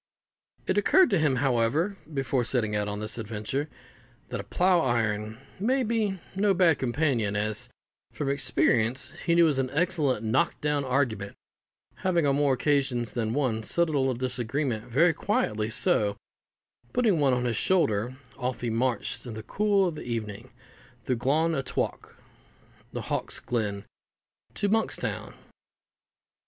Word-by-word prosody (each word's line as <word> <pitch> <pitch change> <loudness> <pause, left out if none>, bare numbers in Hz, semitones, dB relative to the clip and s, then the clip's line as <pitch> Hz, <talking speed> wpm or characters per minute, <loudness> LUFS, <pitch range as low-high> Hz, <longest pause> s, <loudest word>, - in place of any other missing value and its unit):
It - - +2
occurred 365 - +4
to 195 - +3
him, 150 -4 +2
however, 135 - +1 0.2
before 135 -3 0
setting 110 -3 -1
out 105 0 0
on 105 0 -4
this 110 +2 -3
adventure, 115 +7 -3 0.6
that - - -4
a - - -4
plough 180 0 +2
iron 110 -5 0 0.2
may 255 +6 +1
be 215 -4 0 0.2
no 200 0 +2
bad 170 -5 +4
companion, 120 -5 0
as, 105 +1 -1 0.4
from 145 - -4
experience, 130 -3 +1 0.2
he 170 - +4
knew 170 - +6
it - - +6
was 145 -4 +2
an 130 -1 0
excellent 150 - 0
knock 110 +4 +1
down 150 -1 0
argument, 125 -7 -1 0.6
having 175 -4 +1
on 140 -1 +2
more 145 -2 +3
occasions 130 -4 0
than 115 -1 -1
one 125 -6 0
settled 160 +7 +1
a - - +3
little 130 -1 +1
disagreement 125 -1 -2
very 165 +8 +3
quietly: 110 - -1
so, 110 - +2 0.8
putting 225 -9 +2
one 140 -3 +3
on 125 0 0
his 120 -2 0
shoulder, 125 - +1 0.2
off 125 -2 -3
he 120 -1 -1
marched, 120 +1 -1
in 115 - -6
the 110 - -7
cool 200 - +2
of 170 - -2
the 150 - -7
evening, 115 0 -5 0.5
through 125 +2 -1
Glaun 155 +7 +1
a 140 - 0
Thowk - - -3 0.8
(the - - -4
Hawk's - - -2
Glen) 105 -4 -2 0.7
to 205 - 0
Monkstown. 220 +2 -1
130 Hz, 155 wpm, -27 LUFS, 115-165 Hz, 0.8 s, knew